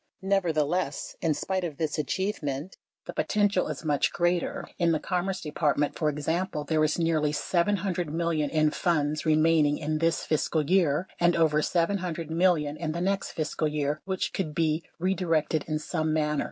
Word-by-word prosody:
Nevertheless, 175 -5 0
in 160 -3 +1
spite 190 +3 -2
of 160 -5 -4
this 155 -1 -2
achievement, 150 -1 -2 0.3
the - - -6
potential 205 -3 +1
is 155 +1 -6
much 145 -2 +2
greater. 175 0 0
In 170 -1 +3
the 155 - +1
Commerce 185 +2 -2
Department, 150 -1 0
for 155 - +1
example, 150 +2 -2
there 155 +1 +1
is 155 0 +1
nearly 160 -3 +1
$700 180 +1 0
million 160 -1 0
in 155 -1 +2
funds 155 -2 0
remaining 155 -1 +4
in 155 0 -2
this 165 0 +1
fiscal 155 0 +1
year 175 -2 +2
and 175 0 +4
over 155 -2 +3
$700 170 -2 -1
million 160 -4 +2
in 160 -1 -2
next 195 +1 -1
fiscal 155 0 -1
year 150 0 -1
which 190 -1 -2
could 155 -6 -3
be 160 -1 +1
redirected 165 -4 0
in 155 -1 -1
some 155 0 -2
manner. 150 -1 +1
160 Hz, 160 wpm, -27 LUFS, 150-175 Hz, 0.3 s, remaining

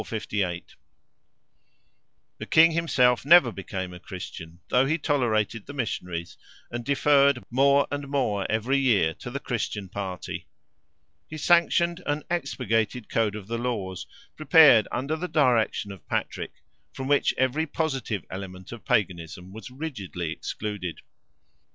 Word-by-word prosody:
The 100 -5 -3 1.9
king 165 +1 +7
himself 135 -7 +2
never 145 -4 +7
became 95 -2 -6
a 90 - -10
Christian, 85 -3 -9
though 130 +2 +3
he 160 +3 +1
tolerated 115 -8 0
the 145 - -7
missionaries, 90 -9 -4 0.3
and 120 0 -4
deferred 140 -1 +3
more 140 +3 +4
and 145 0 -4
more 120 -8 0
every 120 +6 +1
year 105 -12 +3
to - - -7
the 140 +3 -4
Christian 105 -6 -3
party. 95 -2 -6 0.8
He 155 - -7
sanctioned 170 +2 +3
an 145 +1 -1
expurgated 125 - -1
code 110 -2 0
of 105 -3 -7
the 115 +3 -3
laws, 100 -7 -3 0.3
prepared 155 - +6
under 135 +6 -2
the 175 +3 -4
direction 125 - +1
of 95 - -12
Patrick, - - -4 0.3
from 130 - -6
which 145 0 +2
every 135 +5 +1
positive 135 - -2
element 95 -1 -8
of 120 -2 -9
Paganism 90 -1 -2
was 110 +1 -9
rigidly 110 - -5
excluded. 100 -1 -5
120 Hz, 130 wpm, -26 LUFS, 100-140 Hz, 1.9 s, king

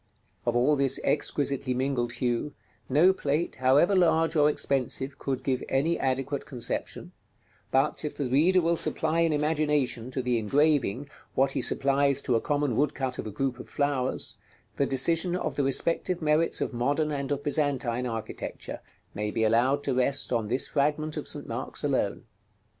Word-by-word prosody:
Of 120 - +1
all 130 +5 +3
this 135 -1 +2
exquisitely 140 -3 0
mingled 125 -2 -1
hue, 125 +3 -2 0.3
no 160 +8 +5
plate, 155 -1 -2
however 135 +9 +4
large 165 -2 +3
or 150 -1 +5
expensive, 135 -1 -2
could 135 -2 -3
give 130 -2 0
any 150 +6 +1
adequate 135 +1 -2
conception; 125 -5 -4 0.6
but, 135 +4 +1
if 150 - -5
the 145 - -1
reader 165 +9 +3
will 170 0 +1
supply 160 +1 0
in 165 -1 +3
imagination 150 -5 0
to 130 0 -3
the 125 -2 +1
engraving 140 +1 +1 0.3
what 135 +1 +3
he - - -1
supplies 140 0 +2
to 125 - +1
a 115 - +1
common 145 -4 0
woodcut 135 -2 -1
of - - -4
a - - -5
group 130 +3 -2
of - - -10
flowers, 130 -6 -2 0.4
the 140 - +1
decision 165 +6 +2
of 180 - -2
the 145 - -1
respective 170 +6 0
merits 155 +1 +1
of - - -2
modern 145 +6 0
and 140 -1 -3
of 145 0 -2
Byzantine 135 -5 0
architecture 115 -2 -6 0.3
may 105 0 -3
be 110 - -1
allowed 120 +6 +2
to 135 - 0
rest 130 +1 +2
on 115 -3 0
this 125 +5 +1
fragment 150 +1 0
of - - -5
St. - - -3
Mark's - - -2
alone. - - 0
140 Hz, 170 wpm, -27 LUFS, 130-150 Hz, 0.6 s, no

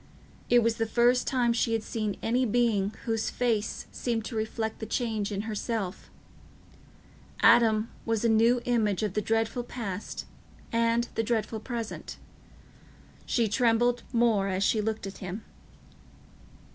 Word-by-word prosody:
It 240 -1 +5
was 230 0 +1
the 225 - 0
first 240 +2 +3
time 245 -3 +2
she 230 0 +1
had 225 -1 0
seen 215 -4 -3
any 245 +3 +2
being 220 -4 +2
whose 225 -1 0
face 225 -3 -1
seemed 230 -3 -2
to 235 - -6
reflect 220 0 -2
the 220 - -5
change 220 -3 -1
in 200 -1 -2
herself: 215 -2 -4 1.3
Adam 220 -2 +5 0.2
was 225 0 0
a - - +5
new 230 +2 +4
image 220 -5 +1
of 210 -3 -1
the 210 - 0
dreadful 225 +3 0
past 215 -5 -5 0.5
and 230 +1 +2
the - - 0
dreadful 225 -1 -1
present. 230 -1 -5 1.1
She 235 -2 +2
trembled 240 +2 +2
more 230 -5 +3
as 190 0 0
she 215 +1 +2
looked 220 -1 -2
at 195 - -8
him. 190 +3 -6
225 Hz, 145 wpm, -28 LUFS, 215-235 Hz, 1.3 s, It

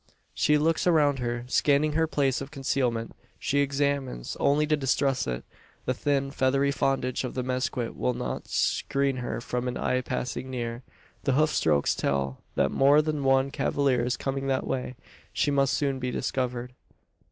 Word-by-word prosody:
She 150 - +3
looks 160 +4 +1
around 145 -5 +4
her, 120 -1 -2
scanning 145 +3 +2
her 160 +1 +2
place 140 -4 +1
of 135 - -6
concealment. 130 -5 -1 0.3
She 140 - 0
examines, 140 - -1
only 150 +2 +3
to 150 0 +2
distrust 135 -1 +1
it. 60 -1 -3 0.4
The 130 - +1
thin, 140 +1 0
feathery 140 +1 +2
frondage 135 -2 0
of 125 - -5
the 130 - -1
mezquit 125 -1 -2
will 125 - 0
not - - -4
screen 140 -1 0
her 125 -1 -3
from 125 +1 -3
an 125 - -2
eye 130 0 0
passing 125 +1 -4
near. 120 -2 -4 0.4
The 135 - +2
hoof 155 +3 +3
strokes 75 -3 +2
tell, 70 -1 -1
that 70 - +2
more 145 +3 +5
than 150 -2 -2
one 135 0 +3
cavalier 135 -4 +1
is 125 +1 -1
coming 135 0 -3
that 135 -1 0
way. 125 -1 -3 0.4
She 145 - +1
must 140 -1 +2
soon 140 -2 0
be 125 0 -2
discovered. 125 -1 -2
135 Hz, 170 wpm, -27 LUFS, 125-140 Hz, 0.4 s, more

